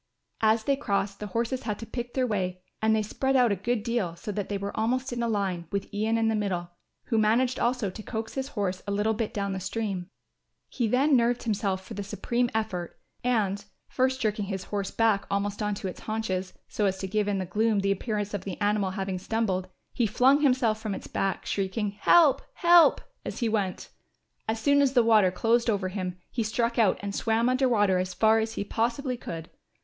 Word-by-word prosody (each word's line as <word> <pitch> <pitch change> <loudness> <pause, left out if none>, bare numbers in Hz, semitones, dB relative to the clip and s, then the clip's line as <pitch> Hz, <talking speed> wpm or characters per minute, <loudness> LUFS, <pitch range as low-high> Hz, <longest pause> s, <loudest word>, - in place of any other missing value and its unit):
As 220 0 +3
they 275 +4 +2
crossed, 200 -6 -1
the 210 - -5
horses 235 +5 -1
had 210 -2 -3
to 225 - -7
pick 240 +1 -6
their 260 -1 +2
way 185 -5 -2 0.2
and 220 0 +3
they 215 - +1
spread 265 +6 -1
out 245 -4 +5
a - - +2
good 220 +3 -1
deal 225 -8 -1
so 210 +5 -6
that 205 -1 -4
they 205 - -1
were 200 +1 -5
almost 250 +4 0
in 240 - -2
a 235 - +1
line, 195 -6 -1
with 200 +1 -3
Ian 220 +2 +1
in 225 0 +2
the 225 - +2
middle, 185 -5 -2 0.3
who 225 - 0
managed 240 +4 +2
also 240 -5 0
to 215 - -8
coax 220 +1 -5
his 265 0 -3
horse 195 -7 -2
a - - -1
little 210 +2 +1
bit 220 0 -2
down 200 -1 -2
the 190 - -3
stream. 195 -2 -3 0.6
He 240 -3 -1
then 270 +6 +3
nerved 240 0 +2
himself 195 -4 -1
for - - -8
the 205 - -4
supreme 235 +5 -1
effort 205 -6 -3 0.2
and, 205 -5 +1 0.3
first 260 0 +1
jerking 215 -3 0
his 195 -1 -4
horse 200 0 -3
back 220 -3 +1
almost 200 +1 -1
on 210 -1 0
to 195 - -5
its 185 - -6
haunches, 195 -4 -3
so 210 - 0
as 190 0 -1
to 190 - -4
give 210 +1 0
in 205 -1 0
the 190 - -2
gloom 210 +3 +1
the 195 0 +1
appearance 205 0 -2
of 205 - -3
the 190 -3 -6
animal 205 -1 +1
having 190 -1 -3
stumbled, 190 -3 -1 0.2
he 235 - +1
flung 265 +7 +4
himself 250 -6 +2
from 215 -3 -3
its - - -8
back 195 -1 -2
shrieking, 200 +1 -1
"Help, 275 +6 +5
help," 345 -1 +6 0.2
as - - -5
he 235 - 0
went. 205 -4 -2 0.6
As 220 0 -1
soon 285 +4 +4
as 270 -2 +3
the 245 -3 +5
water 215 -4 +5
closed 230 +6 +1
over 195 -4 0
him 185 -2 -4
he 240 - -1
struck 230 +2 0
out 210 -5 +4
and 200 -1 -4
swam 225 +3 +1
under 255 +1 +2
water 205 -5 +3
as 185 0 -3
far 220 0 +4
as 220 0 -2
he 200 - -2
possibly 240 +5 -1
could. 165 -8 -7
215 Hz, 220 wpm, -27 LUFS, 195-235 Hz, 0.6 s, help